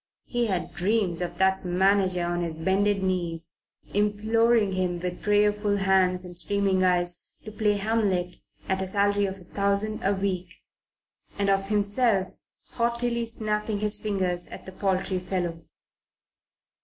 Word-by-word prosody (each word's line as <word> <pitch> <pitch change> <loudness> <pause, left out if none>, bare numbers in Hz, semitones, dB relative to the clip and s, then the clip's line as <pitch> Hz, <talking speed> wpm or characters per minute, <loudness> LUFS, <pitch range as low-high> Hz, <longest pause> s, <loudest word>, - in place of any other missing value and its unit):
He 240 -1 -1
had 185 -4 -2
dreams 190 -3 0
of 175 0 -4
that 190 +1 +2
manager 185 0 +2
on 175 0 -1
his 165 -2 -3
bended 195 +4 +1
knees, 170 -3 -2 0.3
imploring 215 +1 +2
him, 180 -2 -1
with 180 0 -4
prayerful 210 0 +2
hands 190 -2 +2
and 175 -1 -10
streaming 195 0 +1
eyes, 175 -1 +2 0.2
to 215 - -7
play 210 -1 +1
Hamlet 195 -4 0 0.3
at 190 0 0
a 190 - -2
salary 200 +1 +2
of 190 0 -6
a - - -14
thousand 200 +3 0
a 200 +1 +2
week 190 -2 -3 0.8
and 200 -1 +2
of 195 0 +1
himself 205 -1 +1 0.4
haughtily 235 0 0
snapping 215 -2 -2
his 210 0 0
fingers 185 -4 -1
at - - -10
the 190 - -8
paltry 190 -1 -1
fellow. 175 -3 -3
195 Hz, 145 wpm, -26 LUFS, 180-210 Hz, 0.8 s, that